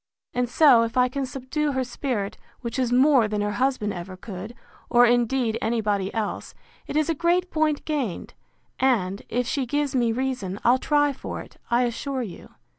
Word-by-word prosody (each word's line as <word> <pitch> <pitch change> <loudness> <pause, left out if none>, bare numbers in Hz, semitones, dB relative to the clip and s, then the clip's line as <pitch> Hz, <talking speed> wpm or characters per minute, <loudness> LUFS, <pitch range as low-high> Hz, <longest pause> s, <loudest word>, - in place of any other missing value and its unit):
And 245 -1 0
so, 265 -3 +6
if 230 +2 -2
I 250 0 +5
can 270 +1 -3
subdue 275 +3 -2
her 260 0 0
spirit, 245 -5 -3 0.3
which 235 +1 -4
is 250 -2 +1
more 260 -2 +5
than 210 0 -2
her 205 0 0
husband 255 -6 +1
ever 185 +1 -7
could, 200 +3 -8 0.3
or 240 0 +6
indeed 240 -1 +2
any 230 +1 0
body 200 -3 0
else, 220 -2 -4 0.3
it - - -5
is 310 - +2
a 330 - +1
great 345 +3 +1
point 310 -2 0
gained: 275 - -3 0.5
And, 205 -7 +1
if 245 +1 0
she 265 +1 -1
gives 290 +2 0
me 240 -3 +2
reason, 230 -6 -2
I'll 250 +2 +4
try 290 0 +2
for - - -6
it, - - -14
I 240 +1 +3
assure 255 +2 -2
you. 195 -7 -9
245 Hz, 190 wpm, -25 LUFS, 220-275 Hz, 0.5 s, so